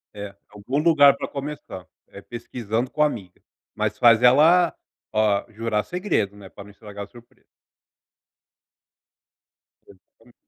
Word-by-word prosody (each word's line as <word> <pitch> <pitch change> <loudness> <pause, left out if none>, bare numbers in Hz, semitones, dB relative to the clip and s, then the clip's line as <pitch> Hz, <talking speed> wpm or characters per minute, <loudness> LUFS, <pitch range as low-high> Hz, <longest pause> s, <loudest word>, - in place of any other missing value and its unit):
É 100 -1 -8
algum 105 +7 -5
lugar 150 -3 +5
para - - -5
começar, 140 - -8 0.2
é 100 - -12
pesquisando 120 +1 -4
com 150 - -3
a 150 - +6
amiga, 100 -10 -9 0.3
mas - - -2
faz 115 -1 +5
ela, 160 +8 +5 0.4
ah, 105 -2 +1
jurar 110 -1 -2
segredo, 175 - -2
né, 95 -2 -12
pra 100 - -12
não 100 - -15
estragar 100 0 -10
a - - -21
surpresa. 120 +1 -19 2.4
Exatamente. 115 +5 -22
115 Hz, 130 wpm, -23 LUFS, 100-140 Hz, 2.4 s, a